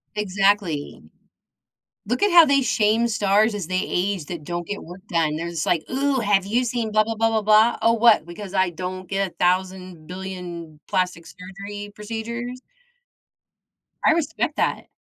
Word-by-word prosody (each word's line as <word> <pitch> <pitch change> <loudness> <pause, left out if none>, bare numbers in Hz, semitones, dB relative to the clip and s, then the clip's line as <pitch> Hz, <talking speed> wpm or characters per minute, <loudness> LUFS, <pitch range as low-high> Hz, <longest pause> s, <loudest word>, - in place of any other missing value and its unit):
Exactly. 195 -6 0 1.1
Look 245 +4 -2
at 410 - +4
how 340 -1 +9
they 280 -2 +3
shame 220 -1 +2
stars 210 0 +2
as 200 -5 -4
they 185 +1 0
age 185 -3 -2
that 170 -2 -7
don't 175 +1 -4
get 205 - -5
work 175 +3 -11
done, 160 -3 0
they're 165 +2 -4
just 170 -2 -3
like, 170 -3 +1
"Ooh, 270 0 +1
have 205 -3 +2
you 230 +6 0
seen 235 -2 -2
blah, 215 0 +5
blah, 225 +1 -3
blah, 225 +1 +1
blah, 220 -1 0
blah?" 215 +2 +4
Oh, 230 +1 +4
what? 230 -7 +4
Because 185 +3 -8
I 190 -1 +2
don't 185 +1 -6
get 195 -1 -1
1000, 180 -1 -1
billion 180 -4 -7
plastic 180 -3 -1
surgery 200 +4 -9
procedures? 235 +4 -6 1.5
I - - +6
respect 325 -2 -1
that. - - -1
200 Hz, 165 wpm, -23 LUFS, 180-225 Hz, 1.5 s, how